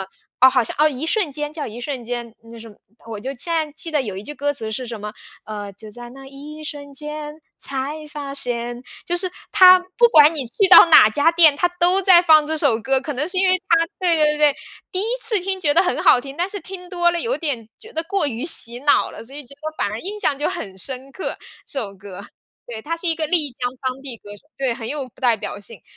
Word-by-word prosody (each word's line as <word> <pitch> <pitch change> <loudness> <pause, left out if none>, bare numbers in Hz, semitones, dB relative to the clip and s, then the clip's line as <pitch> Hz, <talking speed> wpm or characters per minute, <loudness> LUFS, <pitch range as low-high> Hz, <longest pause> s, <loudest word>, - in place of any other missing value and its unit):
呃， 190 - -5 0.3
哦 260 +1 +8
好 255 -1 +2
像， - - -5
《一 280 +3 -5
瞬 365 -5 -1
间》， 295 +1 -3
叫 305 - -5
《一 230 +2 -9
瞬 255 -2 -5
间》， 240 -1 -5 0.2
那 230 - -11
什 230 - -11
么。 205 - -17 0.3
我 220 -2 -7
就 260 +6 -5
现 245 - +1
在 310 -2 -1
记 320 +2 -1
得 300 -3 0
有 210 -6 -6
一 190 - -7
句 295 +7 -7
歌 290 0 -2
词 225 -6 -5
是 245 +3 -4
什 230 -2 -7
么， 210 +1 -6 0.3
呃， 205 -2 -7
就 215 +2 -11
在 240 +2 -11
那 270 +1 -13
一 295 +3 -11
瞬 285 -1 -8
间， 300 +1 -7 0.2
才 285 +3 -4
发 285 -2 -7
现， 240 -2 -4 0.2
就 350 - 0
是 370 0 +1 0.2
它 370 0 +8 0.2
不 480 - +6
管 305 +1 +6
你 275 -5 -2
去 380 - +1
到 355 - +10
哪 310 -9 +7
家 290 +9 +2
店， 320 -4 +5
它 355 - +2
都 365 +3 +3
在 365 -2 +7
放 315 -3 +5
这 315 +1 -2
首 270 -7 +2
歌， 265 +3 0
可 290 +2 -6
能 280 +4 -2
是 370 +2 -3
因 375 0 +3
为 370 - +4
它 330 0 +4
对 360 -3 +1
对 305 - +3
对 300 -1 +3
对， - - -20 0.4
第 370 - +6
1 410 - +3 0.2
次 450 -4 +3
听 380 +1 -3
觉 300 -6 +1
得 340 +5 +4
很 360 - -1
好 245 - +5
听， 275 +3 -10
但 350 - -1
是 400 0 -7
听 360 -2 -10
多 345 -2 +2
了 345 - -3
有 475 +7 -2
点 250 -9 -4
觉 445 - -12
得 320 - -4
过 380 -1 -1
于 245 -1 -4
洗 240 -7 +5
脑 285 0 +2
了， - - -11
所 265 - -11
以 295 - -8
觉 280 - -12
得 310 +2 -7
反 - - -1
而 215 - -5
印 415 - -7
象 280 -7 0
就 295 - -1
很 195 -2 -5
深 265 +6 -5
刻， 375 - -6 0.3
这 275 - -4
首 200 -3 -6
歌。 195 -1 -11 0.5
对， 230 -2 -8
他 330 +7 -4
是 340 +1 -4
一 325 - 0
个 315 - -2
丽 310 -3 0
江 245 0 -4
当 260 0 -4
地 265 -4 -8
歌 205 - -14
手， - - -21
对， 265 -3 -1
很 230 -1 -7
有 285 -3 -5
代 240 -3 +1
表 205 -1 -7
性， 205 -2 -10
285 Hz, 275 characters per minute, -20 LUFS, 240-330 Hz, 0.5 s, 到